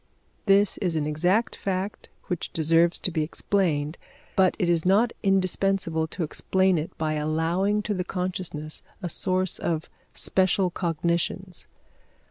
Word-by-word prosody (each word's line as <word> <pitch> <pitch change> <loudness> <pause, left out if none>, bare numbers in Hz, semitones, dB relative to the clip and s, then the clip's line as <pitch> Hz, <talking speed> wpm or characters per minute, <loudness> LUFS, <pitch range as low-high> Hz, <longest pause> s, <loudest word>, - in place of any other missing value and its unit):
This 200 0 +4
is 180 -5 -1
an 155 -2 0
exact 175 +9 +1
fact 195 +1 -4 0.2
which 180 -3 -3
deserves 165 +2 +3
to 185 - 0
be 160 -2 0
explained, 155 -2 0 0.4
but 185 -1 +4
it 180 - 0
is 170 -2 +2
not 210 +6 +3
indispensable 190 -4 +1
to 170 +2 -4
explain 190 +3 +1
it 155 - -6
by 155 -1 -1
allowing 165 +7 0
to 210 - -1
the 185 -2 -2
consciousness 180 -4 -3 0.2
a 175 - -2
source 185 +1 0
of 160 -1 -2 0.2
special 185 -1 +2
cognitions. 170 +2 -2
180 Hz, 135 wpm, -26 LUFS, 160-190 Hz, 0.4 s, This